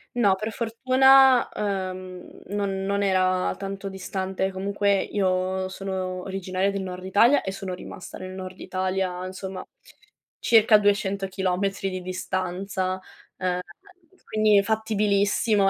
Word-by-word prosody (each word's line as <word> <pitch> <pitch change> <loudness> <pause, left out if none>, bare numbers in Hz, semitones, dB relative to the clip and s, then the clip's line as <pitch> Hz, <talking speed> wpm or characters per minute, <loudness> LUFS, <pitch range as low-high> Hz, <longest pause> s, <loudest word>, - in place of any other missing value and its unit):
No, 205 -6 +4
per 215 +3 -4
fortuna, 255 +3 +5
ehm, 185 -3 -5
non 195 -1 -2
non 200 0 0
era 185 -1 +2
tanto 195 0 -5
distante. 190 0 -3
Comunque 200 +1 +1
io 185 -1 -1
sono 185 -1 -4
originaria 190 0 -1
del 195 -1 -3
nord 185 0 -6
Italia 230 +9 +4
e 190 - -3
sono 195 -1 -5
rimasta 180 - -9
nel 185 0 -7
nord 185 0 -8
Italia, 185 -1 -2
insomma, 190 0 -6 0.8
circa 220 -1 +6
200 200 -1 +1
chilometri 190 +1 -1
di 185 - -4
distanza. 185 +1 -3 0.4
Ehm, 180 -1 -1 0.6
quindi, 215 -2 +3
fattibilissimo, 210 -1 +2
195 Hz, 120 wpm, -25 LUFS, 185-205 Hz, 0.8 s, circa